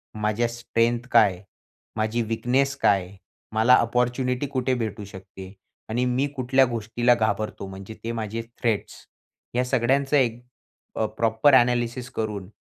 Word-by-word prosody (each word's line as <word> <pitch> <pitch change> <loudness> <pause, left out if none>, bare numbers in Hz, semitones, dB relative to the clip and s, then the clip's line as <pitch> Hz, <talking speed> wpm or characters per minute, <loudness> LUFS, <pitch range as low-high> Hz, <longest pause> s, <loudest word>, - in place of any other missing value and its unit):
माझ्या 110 +2 0
स्ट्रेंथ 120 0 -1
काय 110 -4 +6
आहे? 90 +2 -14 0.5
माझी 110 +2 0
वीकनेस 125 +5 0
काय 100 -7 +3
आहे? 95 +2 -15 0.4
मला 115 +3 +5
अपॉर्च्युनिटी 125 +3 0
कुठे 130 -1 -1
भेटू 110 -3 -4
शकते 95 0 -11 0.4
आणि 120 +3 0
मी 125 +3 +1
कुठल्या 130 +1 +3
गोष्टीला 120 +1 +1
घाबरतो, 110 -3 -2
म्हणजे 95 +3 -9
ते 115 - -3
माझे 115 0 -4 0.2
थ्रेड्स. 115 -4 -1 0.6
ह्या 125 +1 +1
सगळ्यांचं 135 +3 +2
एक 120 -2 0 0.5
अ, 110 - +1
प्रॉपर 115 +5 +3
एनालिसिस 120 0 +2
करून, 105 -4 -3
115 Hz, 140 wpm, -24 LUFS, 110-125 Hz, 0.6 s, काय